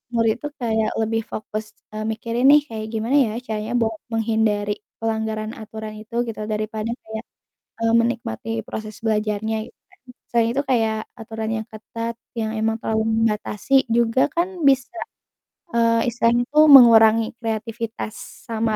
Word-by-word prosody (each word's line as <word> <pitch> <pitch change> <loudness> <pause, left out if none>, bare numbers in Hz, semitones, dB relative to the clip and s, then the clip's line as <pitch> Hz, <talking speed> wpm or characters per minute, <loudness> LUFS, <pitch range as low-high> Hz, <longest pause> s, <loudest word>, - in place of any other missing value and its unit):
murid 225 -1 +3
tuh 295 - -5
kayak 220 -2 0
lebih 225 0 0
fokus, 215 0 -4 0.3
eee, 215 0 -4
mikirin 230 +3 -2
nih 295 +1 +8
kayak 220 -1 -5
gimana 225 +5 0
ya - - -5
caranya 220 +1 -3
buat 225 -2 0 0.2
menghindari 215 -2 0 0.2
pelanggaran 220 -1 -2
aturan 220 -1 -8
itu 220 +2 -11
gitu. 225 -2 -5
Daripada, 215 +1 -3 0.2
kayak, 220 0 -6 0.6
eee, 225 0 +2
menikmati 230 - -1 0.2
proses 215 -1 -7
belajarnya 215 0 0 0.2
gitu - - -59
kan. - - -26 0.3
Selain 230 -1 +2
itu 275 - +1
kayak 225 -4 +2 0.2
aturan 220 -1 -5
yang 220 -1 -4
ketat 230 +2 -5 0.2
yang 220 -1 -1
emang 220 0 +1
terlalu 220 0 0
membatasi 225 +4 +1
juga 235 +3 +3
kan 345 +2 +2 0.2
bisa, 265 -2 +3 0.8
eee, 230 -1 +3
istilahnya 235 +1 +2
itu 300 - +2
mengurangi 225 -4 +8 0.2
kreativitas 225 0 -4 0.3
sama 225 -1 0
225 Hz, 145 wpm, -22 LUFS, 220-230 Hz, 0.8 s, nih